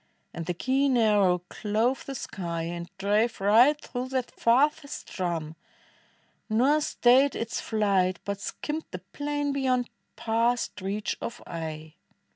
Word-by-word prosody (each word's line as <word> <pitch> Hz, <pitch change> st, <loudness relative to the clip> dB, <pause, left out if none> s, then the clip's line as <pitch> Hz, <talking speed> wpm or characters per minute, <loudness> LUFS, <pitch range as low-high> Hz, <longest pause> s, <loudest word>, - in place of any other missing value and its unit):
And 165 Hz, -1 st, -6 dB
the 180 Hz, -, -1 dB
keen 265 Hz, +5 st, +2 dB
arrow 200 Hz, -6 st, +3 dB
clove 225 Hz, +7 st, -1 dB
the 275 Hz, -, -4 dB
sky, 170 Hz, -8 st, -4 dB
and 170 Hz, +1 st, -5 dB
drave 210 Hz, +4 st, +1 dB
Right 235 Hz, +9 st, +5 dB
through 250 Hz, -2 st, -5 dB
that 260 Hz, -2 st, -2 dB
farthest 280 Hz, +5 st, +1 dB
drum, 165 Hz, -4 st, -3 dB, 0.9 s
nor 265 Hz, +8 st, +3 dB
stayed 265 Hz, -1 st, +4 dB
its 230 Hz, 0 st, -3 dB
flight, 195 Hz, -4 st, +1 dB
But 200 Hz, 0 st, -3 dB
skimmed 310 Hz, +1 st, -4 dB
the 185 Hz, -, -5 dB, 0.2 s
plain 290 Hz, 0 st, -1 dB
beyond, 255 Hz, -3 st, 0 dB, 0.2 s
past 230 Hz, -1 st, 0 dB
reach 200 Hz, +2 st, -2 dB
of 235 Hz, -, -5 dB
eye. 160 Hz, -2 st, -6 dB
225 Hz, 130 wpm, -27 LUFS, 185-260 Hz, 0.9 s, Right